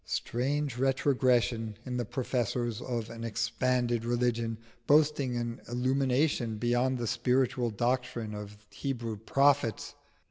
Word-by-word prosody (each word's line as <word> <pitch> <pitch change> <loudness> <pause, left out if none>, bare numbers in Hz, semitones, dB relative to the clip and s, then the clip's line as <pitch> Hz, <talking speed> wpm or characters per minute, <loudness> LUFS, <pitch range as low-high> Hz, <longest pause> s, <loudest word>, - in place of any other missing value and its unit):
Strange 135 +1 -1
retrogression 125 -5 +2
in 125 -1 -4
the 120 - -1
professors 120 -2 -2
of 115 -3 -3
an 115 0 -7
expanded 120 +1 0
religion, 120 -1 0 0.3
boasting 145 -4 +3
an 120 -1 -3
illumination 130 -1 +1
beyond 120 +3 +1
the 120 - -2
spiritual 125 +1 +1
doctrine 120 0 -1
of 105 0 -7
Hebrew 120 -5 -3
prophets! 135 +2 +2
120 Hz, 110 wpm, -30 LUFS, 115-130 Hz, 0.3 s, boasting